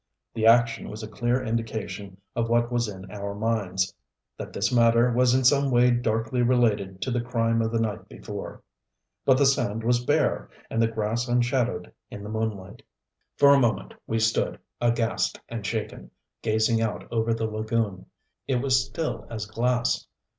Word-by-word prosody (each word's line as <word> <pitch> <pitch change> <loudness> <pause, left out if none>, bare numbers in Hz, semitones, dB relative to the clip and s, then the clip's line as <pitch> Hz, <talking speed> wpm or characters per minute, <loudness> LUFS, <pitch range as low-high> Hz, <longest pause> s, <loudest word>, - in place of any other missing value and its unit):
The 110 0 +1
action 115 0 +4
was 110 +1 -7
a - - -5
clear 120 +3 -1
indication 110 -4 -4 0.2
of 115 -1 0
what 120 +1 +2
was 120 -1 +1
in 95 -2 -9
our 100 -1 -5
minds 100 -4 -1 0.4
that - - -7
this 100 0 -1
matter 115 0 +4
was 125 +1 +4
in 130 - +2
some 140 +2 +4
way 125 0 +4
darkly 115 0 0
related 110 -6 +1
to 130 - -2
the 120 0 0
crime 115 -1 0
of 110 0 -1
the 115 - 0
night 110 -2 -3
before. - - -8 0.6
But 130 -1 +5
the 140 - +4
sand 120 -5 +1
was 120 +1 +2
bare, - - +1 0.2
and 115 - +1
the 115 - +4
grass 115 +2 -2
unshadowed 125 0 0 0.2
in 100 - -8
the 105 - -7
moonlight. 110 -1 -4 0.6
For 140 0 +7
a 140 - +5
moment 120 -5 0
we 115 - 0
stood, 110 0 +1 0.2
aghast 120 -1 0
and 115 -2 -5
shaken, 110 +1 -4 0.3
gazing 110 +1 +2
out 110 -2 -2
over 115 0 0
the 115 0 0
lagoon. 110 -2 -2 0.4
It 135 - +1
was 130 0 +2
still 120 -10 -4
as 110 -2 -4
glass. 120 +3 0
115 Hz, 170 wpm, -26 LUFS, 110-120 Hz, 0.6 s, For